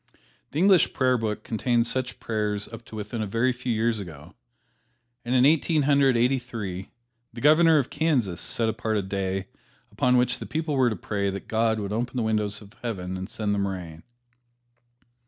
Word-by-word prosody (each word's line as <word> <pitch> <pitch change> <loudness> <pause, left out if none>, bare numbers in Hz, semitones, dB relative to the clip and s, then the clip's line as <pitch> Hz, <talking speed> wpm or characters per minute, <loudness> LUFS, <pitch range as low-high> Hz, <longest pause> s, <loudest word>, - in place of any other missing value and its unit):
The - - -6
English 185 0 +4
Prayer 130 -1 +2
Book 110 -3 -2
contained 115 +1 +1
such 130 +1 -2
prayers 105 -2 -2
up 115 0 -10
to - - -11
within 110 +2 -4
a 105 - -2
very 115 +5 +1
few 125 0 -4
years 115 0 +1
ago, 80 -7 -10 0.9
and 125 +1 -1
in 125 0 +5
Eighteen 155 +1 +3
Hundred 140 -3 +4
Eighty 125 +3 +2
three 105 -7 -6 0.4
the 115 - -8
Governor 155 +4 +5
of 140 - 0
Kansas 135 - 0
set 115 - 0
apart 110 0 -1
a 100 - -1
day 95 0 -2 0.5
upon 125 0 +2
which 125 +1 +2
the - - -7
people 160 -1 -2
were 130 -3 +3
to 110 - -2
pray 100 +2 -2
that 95 0 -6
God 110 0 +1
would 100 0 -4
open 120 +3 -2
the 120 - +1
windows 105 -1 0
of 100 +1 -16
Heaven 95 -6 -4
and 95 +2 -6
send 105 -2 -2
them 100 -1 0
rain. 85 -4 -6
115 Hz, 190 wpm, -25 LUFS, 100-130 Hz, 0.9 s, in